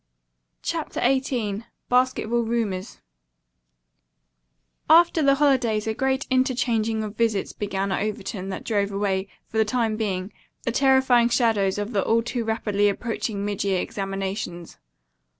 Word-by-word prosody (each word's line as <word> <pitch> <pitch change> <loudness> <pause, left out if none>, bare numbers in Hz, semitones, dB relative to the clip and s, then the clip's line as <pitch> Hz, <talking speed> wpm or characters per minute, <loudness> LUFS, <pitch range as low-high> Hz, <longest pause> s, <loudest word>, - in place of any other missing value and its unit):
CHAPTER - - -3
XVIII 245 -5 0 0.2
BASKETBALL 250 -2 +2
RUMORS 220 -4 -2 1.9
After 335 0 +6
the 275 -1 +4
holidays 255 -7 +2
a 220 - -1
great 265 +4 0
interchanging 235 -4 +1
of 210 0 -6
visits 225 -4 0
began 200 -1 -2
at - - 0
Overton 205 -2 -4
that 190 - -5
drove 205 -3 0
away, 195 -1 -1 0.2
for 220 - -3
the - - +6
time 220 -1 0
being, 195 -2 -2 0.3
the - - -1
terrifying 265 -2 +4
shadows 225 -6 +2
of 205 +3 -3
the 195 - +1
all 230 +1 +2
too 240 0 -2
rapidly 210 -2 +1
approaching 210 -1 -3
mid 205 0 -2
year 195 -2 +1
examinations. 195 -3 -4
220 Hz, 130 wpm, -24 LUFS, 200-245 Hz, 1.9 s, After